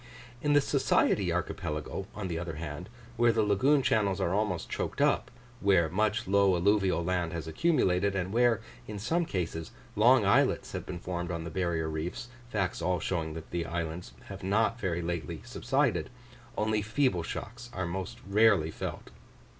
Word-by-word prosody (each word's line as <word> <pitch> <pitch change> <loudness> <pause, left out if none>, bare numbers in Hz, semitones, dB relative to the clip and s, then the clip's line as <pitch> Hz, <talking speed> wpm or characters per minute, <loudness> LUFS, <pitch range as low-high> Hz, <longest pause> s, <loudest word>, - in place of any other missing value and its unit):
In 145 -1 +2
the 145 - +6
Society - - +2
archipelago, 75 +6 -3
on 105 -2 -4
the 85 -2 -3
other 85 -2 -5
hand, 75 +2 -6 0.3
where 120 0 +5
the 110 -1 +2
lagoon 130 +8 +3
channels 100 -5 +2
are 90 -2 0
almost 100 -4 0
choked - - -3
up, - - +2 0.3
where 95 -6 +3
much 105 +4 0
low 100 -1 +4
alluvial 95 -1 +2
land 90 -1 -1
has 80 -1 -4
accumulated, 100 - +2
and 95 +1 -2
where 120 -1 +3 0.3
in 105 - -5
some 165 +12 0
cases 80 - -3 0.3
long 115 +1 +5
islets 100 - +3
have - - -5
been 90 - -4
formed 85 -1 -4
on 85 -2 -3
the 85 - -6
barrier 85 -3 -1
reefs 85 +10 -4 0.2
facts 95 -6 -1
all 90 -1 +1
showing 80 -1 -2
that 80 0 -9
the 85 -1 -1
islands 85 +1 -4
have - - -8
not 110 +5 +1
very 85 -5 -1
lately 85 -2 -4
subsided - - 0 0.5
only 110 0 +1
feeble 105 -2 +1
shocks 120 +8 -6
are 95 -6 -3
most 95 +6 -4
rarely 100 -6 +4
felt. - - -6
95 Hz, 170 wpm, -30 LUFS, 85-110 Hz, 0.5 s, the